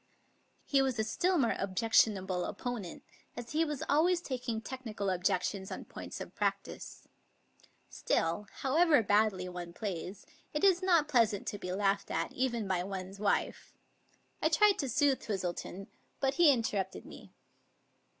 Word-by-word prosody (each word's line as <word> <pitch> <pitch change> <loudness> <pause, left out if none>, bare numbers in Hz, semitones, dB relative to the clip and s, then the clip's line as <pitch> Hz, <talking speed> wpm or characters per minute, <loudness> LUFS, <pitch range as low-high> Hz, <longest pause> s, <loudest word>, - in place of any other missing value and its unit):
He 275 -2 +3
was 265 -3 0
a 220 - +1
still 355 - +1
more 245 -6 +2
objectionable 190 -2 +2
opponent, 240 -8 -5 0.3
as 240 -1 -7
he 315 +2 +2
was 300 -4 -3
always 340 +5 +3
taking 250 -8 -3
technical 220 -5 -4
objections 190 +1 -1
on - - -6
points - - -8
of - - -8
practice. - - -3 0.8
Still, 170 +5 -1
however 295 -1 +4
badly 205 -3 +2
one 175 -1 -7
plays, 195 0 -5 0.3
it 300 - -1
is 380 -2 +5
not 340 -5 +3
pleasant 230 -7 +2
to 205 - -6
be 180 - -5
laughed 200 +1 0
at, - - -2
even 235 -5 -1
by 185 -2 0
one's 190 +1 -6
wife. 200 -1 -1 0.7
I - - +3
tried 420 -2 +4
to 275 - -1
soothe 280 +1 +2
Twistleton, 190 -1 -4 0.3
but 270 -1 +1
he 310 0 +6
interrupted 210 -7 -2
me. - - -13
220 Hz, 145 wpm, -32 LUFS, 190-275 Hz, 0.8 s, he